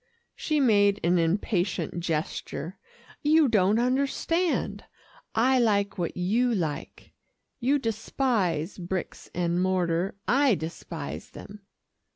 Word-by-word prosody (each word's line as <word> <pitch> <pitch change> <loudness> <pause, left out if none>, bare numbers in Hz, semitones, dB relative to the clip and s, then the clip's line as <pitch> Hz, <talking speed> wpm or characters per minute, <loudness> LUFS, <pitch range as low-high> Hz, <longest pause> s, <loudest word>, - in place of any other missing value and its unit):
She 305 -1 0
made 205 -6 +4
an 175 +1 +3
impatient 175 +1 0
gesture. 165 0 -3 0.4
"You 305 0 +4
don't 210 -2 +3
understand. 280 +8 0 0.5
I 255 +3 +4
like 200 -4 +1
what 170 - -2
you 225 +7 +1
like. 155 -7 -4 0.5
You 270 +3 +2
despise 215 - -1
bricks 180 +1 -5
and 175 0 0
mortar, 180 -1 0
I 275 -3 +4
despise 160 -2 -6
them." 205 -1 -12
200 Hz, 105 wpm, -27 LUFS, 175-245 Hz, 0.5 s, made